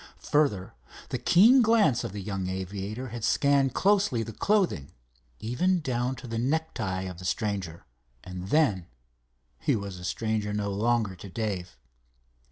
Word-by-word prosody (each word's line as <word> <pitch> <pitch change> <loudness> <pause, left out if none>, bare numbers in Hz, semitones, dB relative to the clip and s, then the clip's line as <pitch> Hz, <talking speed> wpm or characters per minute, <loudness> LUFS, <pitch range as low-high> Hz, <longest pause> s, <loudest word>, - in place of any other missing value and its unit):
Further, 120 -11 +2 0.4
the - - -2
keen 235 +9 +6
glance 215 - +3
of 115 - -4
the 100 0 -6
young 95 -2 -3
aviator 100 +6 -4
had 115 -1 -7
scanned 140 +1 +2
closely 195 - +2
the 115 0 -7
clothing, 175 - 0 0.5
even 180 +12 +1
down 125 -3 -1
to 130 -1 -10
the 115 0 -3
necktie 125 -9 -1
of 90 -2 -7
the - - -9
stranger, 95 -5 -2 0.4
and 90 0 -7
then—he - - -2
was 100 -3 -5
a - - -10
stranger 110 +1 -1
no 105 -1 -1
longer 110 -1 +1
to 100 +2 -10
Dave. 95 - -4
105 Hz, 145 wpm, -27 LUFS, 95-130 Hz, 0.5 s, keen